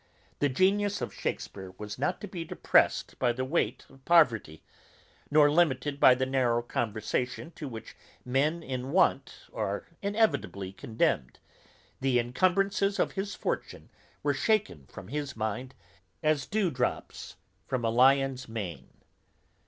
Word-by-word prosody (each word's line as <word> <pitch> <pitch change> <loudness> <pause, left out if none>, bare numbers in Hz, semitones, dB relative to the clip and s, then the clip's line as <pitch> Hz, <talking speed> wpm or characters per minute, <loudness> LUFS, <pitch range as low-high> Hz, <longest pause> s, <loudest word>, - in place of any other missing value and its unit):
The 145 - +2
genius 200 +7 +2
of - - -4
Shakespeare 95 -2 -5
was 105 +2 -7
not 145 +6 0
to 205 - -5
be 180 -3 -5
depressed - - +2
by 125 - +3
the 130 +2 -3
weight 160 +6 -1
of 135 -1 -20
poverty, 120 - +3 0.7
nor 145 0 +5
limited 145 -3 +1
by 130 - +7
the 130 +1 0
narrow 125 -3 +1
conversation 120 +6 -2
to 150 - -7
which 115 -4 -9 0.3
men 145 +7 +1
in 130 -1 -4
want 185 - +1
are - - -2 0.2
inevitably 200 - 0
condemned; 95 - -1 0.6
the 130 -2 +2
incumbrances 195 +10 +1
of - - +1
his 195 +1 -4
fortune - - -4 0.3
were - - +2
shaken 200 - 0
from - - -11
his 145 0 -4
mind, 110 +4 -3 0.5
as 155 -3 +1
dewdrops 175 -13 -2 0.3
from 125 -3 -1
a 115 - +2
lion's 130 +1 +3
mane. 100 -7 -6
135 Hz, 135 wpm, -29 LUFS, 120-170 Hz, 0.7 s, by